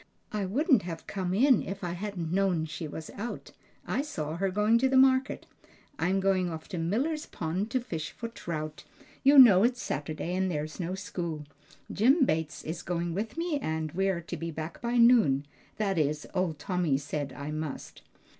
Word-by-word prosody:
I 205 -3 -2
wouldn't 265 - +3
have 165 -2 -7
come 185 -3 -3
in 245 +5 +4
if 195 +1 -6
I 175 - -2
hadn't 180 -3 -4
known 185 -4 +1
she 160 +1 -6
was 160 +1 -7
out. 230 +4 -6 0.3
I - - 0
saw 160 - -4
her 195 +2 0
going 210 +4 +3
to 265 +1 +2
market. 260 0 +4 0.5
I'm 190 +2 +1
going 190 -2 +2
off 160 -1 -7
to 180 - -4
Miller's 270 - -1
Pond 180 +6 -3
to 255 - +1
fish 165 -10 -5
for 230 - -6
trout. 155 -8 -6 0.4
You 280 +1 +6
know 220 -8 +9
it's 245 +1 +2
Saturday 155 - -3
and 190 0 0
there's 155 0 -4
no 180 +1 -2
school. 170 -5 -5 0.5
Jim 265 - +4
Bates 155 -4 -2
is 160 +2 -5
going 170 -1 -2
with 215 - -4
me 335 -3 -1
and 160 - -2
we're 190 0 0
to 170 - -6
be 165 - -4
back 160 +1 -6
by 240 +1 0
noon; 225 - +5 0.3
that 195 -5 0
is, 150 0 0
old 180 -5 0
Tommy 170 -2 0
said 145 0 -4
I 145 +1 -6
must." 155 -2 -6
185 Hz, 185 wpm, -29 LUFS, 160-225 Hz, 0.5 s, know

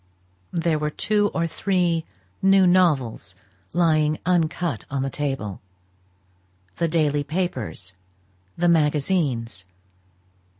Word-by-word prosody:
There 165 -2 0
were 150 0 -1
two 205 +6 +1
or 165 - 0
three 175 -2 0 0.4
new 195 0 +5
novels 150 - +2 0.4
lying 155 -3 +2
uncut 170 - 0
on 135 -1 -1
the 135 - -2
table; 135 -10 -3 1.2
the 170 - +1
daily 150 -3 +1
papers, 135 - -3 0.6
the 175 +1 +2
magazines. 150 - +1
155 Hz, 95 wpm, -23 LUFS, 140-175 Hz, 1.2 s, new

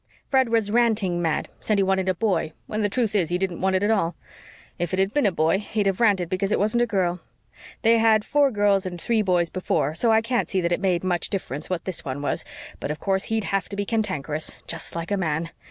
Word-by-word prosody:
Fred 265 -3 +3
was 225 -3 +1
ranting 215 -7 +2
mad 160 -2 0
said 215 - 0
he 195 - +3
wanted 190 0 +1
a 185 - +1
boy 170 -5 0
when 215 - -3
the 205 - +1
truth 225 0 0
is 185 -6 +1
he 175 - +1
didn't 185 -2 -3
want 190 0 +2
it 185 - +1
at 210 - +2
all. 175 -6 +1 0.6
If 175 0 -2
it 185 - +1
had 195 +1 +1
been 290 -7 +3
a - - +2
boy 165 +2 +2
he'd 210 0 -2
have 195 -1 0
ranted 200 -7 +3
because 190 +3 -1
it - - +3
wasn't 215 +4 +2
a 240 - +2
girl. 180 -4 0 0.6
They 230 0 +5
had 220 -1 +4
four 290 -1 +3
girls 205 -4 +2
and 175 -1 -6
three 225 +4 +1
boys 180 -4 +1
before, 155 -5 0
so 225 +8 +2
I 220 0 +5
can't 240 +1 0
see 190 - 0
that 170 0 -1
it 175 - 0
made 185 -3 +1
much 180 -2 -1
difference 150 -6 -4
what 180 -2 -3
this 185 -3 -1
one 135 +2 -5
was, - - -1 0.4
but - - -4
of 150 - -3
course 190 -1 0
he'd 220 -1 -1
have 195 - 0
to 200 - -6
be 205 0 -2
cantankerous, 175 -9 -1
just 165 0 -4
like 170 +3 -4
a 200 - +2
man. 165 -2 -2
190 Hz, 250 wpm, -24 LUFS, 175-215 Hz, 0.6 s, They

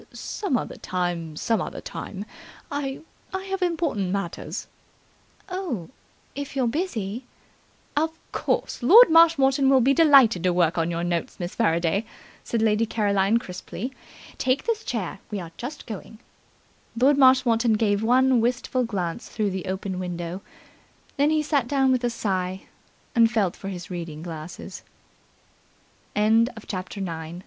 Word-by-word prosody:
"Some 345 -12 -2
other - - -5
time, 175 -3 -3
some 225 +8 0
other - - -5
time. 210 - -7 0.5
I 280 -2 -3 0.3
I 380 - -3
have 385 0 -4
important 325 - 0
matters 190 -3 -4 0.4
" - - -35
"Oh, 360 - -4 0.4
if 285 -1 -6
you're 265 -2 +1
busy 240 - -2 0.4
" - - -35
"Of 315 +2 +2 0.2
course, - - -1
Lord 405 - +8
Marshmoreton 280 -5 +5
will 270 -1 +6
be 265 +3 +4
delighted 275 - +6
to 180 0 +2
work 175 -1 +2
on 165 +1 +1
your 170 0 -2
notes, 175 -1 -2
Miss 175 0 -4
Faraday," 170 -2 +1 0.4
said 230 -2 -1
Lady 220 +1 +2
Caroline 205 -1 +2
crisply. 230 +4 -6 0.5
"Take 260 +2 +1
this 455 -1 -1
chair. 200 - -3
We 210 - -3
are 170 -2 -8
just 275 +5 -7
going." 220 0 -8 0.8
Lord 280 +3 +4
Marshmoreton 250 -3 +5
gave 210 -2 +1
one 250 +2 +4
wistful 250 +2 0
glance 195 -2 -3
through 210 -3 -1
the 190 -1 -4
open 190 0 -3
window. 175 0 -4 0.8
Then 285 +1 +3
he 310 -1 +2
sat 285 -5 +1
down 270 -1 +2
with 255 -1 +1
a 240 - +2
sigh, 190 -5 -2 0.5
and 230 -3 +5
felt 205 -6 +1
for 195 - -8
his 180 -1 -7
reading 165 -3 -6
glasses. 165 -1 -8
230 Hz, 140 wpm, -25 LUFS, 185-270 Hz, 0.8 s, Lord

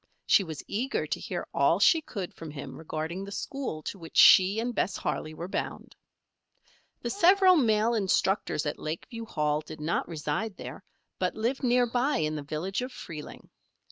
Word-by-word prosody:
She 200 - +5
was 160 -5 -7
eager 245 +7 -2
to - - -3
hear - - -4
all - - +3
she 325 - +5
could 200 - -6
from 165 - -9
him 140 -3 -8
regarding 160 +4 -4
the 200 - -8
school 225 - -4
to 195 - -6
which 165 -1 -8
she 195 +3 +8
and 240 +2 -2
Bess 200 - -1
Harley 155 0 -3
were 170 +2 -5
bound. - - -5 1.1
The - - -2
several 380 0 +6
male 225 -5 +3
instructors 195 -5 +1
at 150 - -3
Lakeview 225 +9 -5
Hall 150 -7 0
did 155 0 -10
not 155 +3 -1
reside 165 +6 -3
there, - - -8 0.4
but - - 0
lived 235 +5 -1
near 245 -1 +3
by 245 +5 +1
in 155 -1 -1
the 150 - -3
village 155 - -3
of 250 +1 -4
Freeling. 155 -9 -9
195 Hz, 175 wpm, -28 LUFS, 155-240 Hz, 1.1 s, she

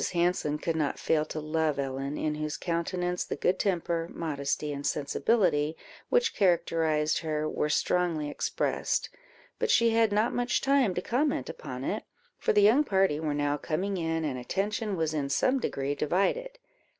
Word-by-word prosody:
Hanson 170 -4 +1
could 165 +1 -2
not 150 -3 0
fail 155 -1 +1
to 155 - -5
love 155 -1 0
Ellen, 135 +1 -3
in 155 - -1
whose 150 0 -3
countenance 180 +1 -1
the - - -4
good 180 - +1
temper, 170 -3 0
modesty, 145 -1 -2
and 140 0 -5
sensibility 155 +1 +1 0.3
which 485 -1 +2
characterized 160 -4 +2
her, 155 -1 -2
were 150 - -1
strongly 165 0 +1
expressed; 145 - -1 0.5
but 470 - 0
she 230 - +4
had 225 -1 +3
not 215 +3 +2
much 245 0 +1
time 270 -8 +2
to - - -2
comment 280 +5 0
upon - - -7
it, - - -2 0.4
for - - +2
the 205 -1 +4
young 235 +9 +6
party 190 - +2
were 155 -2 -1
now 145 0 0
coming 185 +7 -2
in, 165 -2 -1
and 130 -4 -2
attention 205 - -2
was 160 -2 -1
in 145 -3 -1
some 260 - +2
degree 140 - -2
divided. 200 - 0
165 Hz, 165 wpm, -29 LUFS, 150-205 Hz, 0.5 s, young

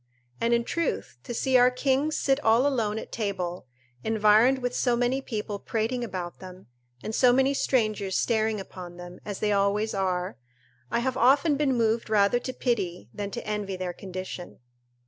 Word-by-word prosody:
And 230 +1 +2
in 235 0 +3
truth, 335 +7 -3
to 245 - -6
see 255 +2 +2
our 250 0 +6
kings 270 +4 0
sit 270 -1 +2
all 225 +4 +4
alone 225 -7 0
at - - -7
table, 185 - -3 0.4
environed 220 +4 +4
with 245 -1 -3
so 245 -2 +2
many 245 +3 +1
people 210 -5 -4
prating 230 +4 -2
about 180 -6 -5
them, 185 0 -11 0.4
and 215 - -4
so 250 +2 +5
many 265 +2 +3
strangers 215 -8 0
staring 220 -2 +1
upon 180 -2 -9
them, 175 0 -10
as 205 -2 -5
they 210 - +1
always 205 +2 +1
are, 180 - -1 0.5
I 235 - 0
have 260 0 -1
often 280 +5 +4
been 275 -2 +1
moved 230 -1 +1
rather 210 +2 +3
to 255 - -5
pity 195 - -2
than 205 -1 -4
to 235 - -6
envy 210 -2 -3
their 180 -1 -4
condition. 185 -1 -7
220 Hz, 175 wpm, -27 LUFS, 195-250 Hz, 0.5 s, our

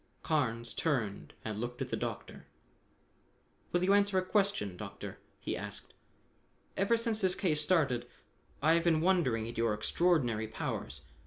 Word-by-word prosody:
Carnes 120 -7 0
turned 115 -11 -1
and 110 -1 -3
looked 120 0 -4
at - - -3
the - - 0
Doctor. - - -5 1.2
"Will 175 0 +2
you 195 +2 +4
answer 200 -1 +4
a 185 - +2
question, 195 - +1
Doctor?" 100 +1 -7 0.2
he - - -3
asked. - - -8 0.8
"Ever 200 +4 +3
since 230 -1 0
this 185 -2 +2
case 155 -5 +1
started, 145 -8 +2 0.6
I 160 +2 +6
have 170 0 +3
been 165 -2 +3
wondering 160 -12 +2
at 115 - -5
your 115 -2 +2
extraordinary 120 -3 +2
powers. 70 -9 -4
150 Hz, 150 wpm, -32 LUFS, 115-185 Hz, 1.2 s, I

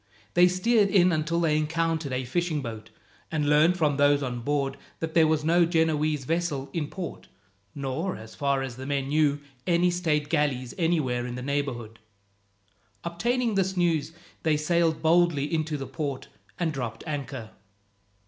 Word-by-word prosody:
They 175 +1 +6
steered 200 +3 +3
in 185 -2 +5
until 160 +1 0
they 160 -3 +2
encountered 160 -1 -1
a 130 0 -2
fishing 155 +2 -1
boat, 110 -3 -7 0.4
and 150 -2 0
learned 155 +4 +4
from 150 -5 +1
those 145 0 +4
on 125 -2 -3
board 140 +1 -1 0.2
that 160 -1 -4
there 160 -2 +5
was 155 -1 +1
no 170 +3 +4
Genoese 155 -3 +1
vessel 150 -4 -1
in 155 -3 -1
port, 180 0 -7 0.5
nor, 145 +7 -2
as 110 0 -11
far 140 -1 0
as 130 -2 -6
the 130 +1 -7
men 140 -1 -1
knew, 145 -1 +2 0.3
any 175 0 +3
state 155 -4 0
galleys 140 -5 0
anywhere 140 -8 +1
in 120 - -5
the 125 - -5
neighbourhood. 130 -5 -3 1.0
Obtaining 235 +8 0
this 190 -1 0
news, 165 -4 +1 0.3
they 155 -2 +2
sailed 160 0 +1
boldly 165 -3 +3
into 155 -1 0
the 135 - -5
port 135 +1 -4 0.3
and 165 -3 -1
dropped 120 -5 -5
anchor. 135 -6 -5
155 Hz, 160 wpm, -27 LUFS, 140-170 Hz, 1.0 s, They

